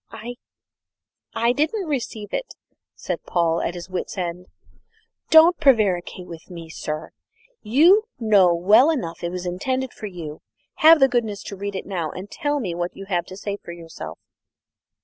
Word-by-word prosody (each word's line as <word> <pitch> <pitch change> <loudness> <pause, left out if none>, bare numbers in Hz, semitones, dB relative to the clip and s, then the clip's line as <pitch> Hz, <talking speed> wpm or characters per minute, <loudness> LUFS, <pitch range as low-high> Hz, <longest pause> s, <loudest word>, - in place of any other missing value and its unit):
"I 240 +3 -8 1.0
I 235 +1 +2
didn't 320 - 0
receive 235 -7 -4
it," - - -4 0.4
said - - -4
Paul, 170 -1 +1
at 175 - -2
his 175 - -7
wits' 185 +2 -5
end. 180 0 -4 0.8
"Don't 325 +2 +7
prevaricate 200 - +2
with 170 0 -11
me, 170 -2 -9
sir; 155 0 -5 0.5
you 335 - +5
know 205 -6 +5
well 205 - +5
enough 235 - -3
it 170 - -1
was 180 0 -5
intended 255 +9 -2
for 215 - -7
you. 165 -5 -8 0.4
Have 320 +1 +7
the 270 - +7
goodness 225 -5 -1
to 200 - -7
read 200 +1 -5
it - - -4
now, 175 -5 -3
and 190 +5 -9
tell 290 -2 -1
me 190 -9 -3
what 175 +1 -4
you 195 - -8
have 175 -3 0
to 185 - -9
say 200 0 -4
for 170 - -10
yourself!" 165 -1 -9
200 Hz, 170 wpm, -23 LUFS, 175-255 Hz, 1.0 s, Don't